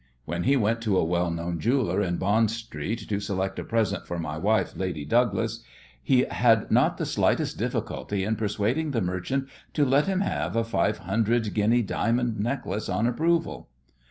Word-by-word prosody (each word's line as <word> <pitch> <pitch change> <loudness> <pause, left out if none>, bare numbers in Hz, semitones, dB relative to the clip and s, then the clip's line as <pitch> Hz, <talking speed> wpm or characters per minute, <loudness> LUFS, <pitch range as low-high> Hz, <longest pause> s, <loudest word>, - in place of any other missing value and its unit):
When 85 +2 -3
he 135 +2 +4
went 115 0 +1
to 105 -4 +1
a - - +3
well 85 +1 0
known 85 0 -3
jeweller 110 - +1
in 85 -3 -1
Bond 105 +3 +2
Street 115 -1 -5
to 100 -1 -1
select 95 -1 -2
a - - -3
"present 115 -3 -1
for 85 - -3
my 80 -3 -4
wife, 105 +7 +1
Lady 90 -6 -3
Douglas," 115 +3 +1 0.4
he 125 - +3
had 115 -3 +2
not - - +3
the - - -2
slightest - - 0
difficulty 100 -2 -2
in 110 +3 0
persuading 110 +8 -1
the 115 - +1
merchant 95 +10 -2 0.3
to 145 - +3
let 140 +4 +3
him 190 -1 +1
have 195 - -2
a 115 - +2
five 110 -2 0
hundred 110 +3 0
guinea 115 +3 +3
diamond 115 +2 0
necklace 110 -3 -2
on 95 +4 0
approval. 165 +7 0
110 Hz, 180 wpm, -26 LUFS, 95-120 Hz, 0.4 s, he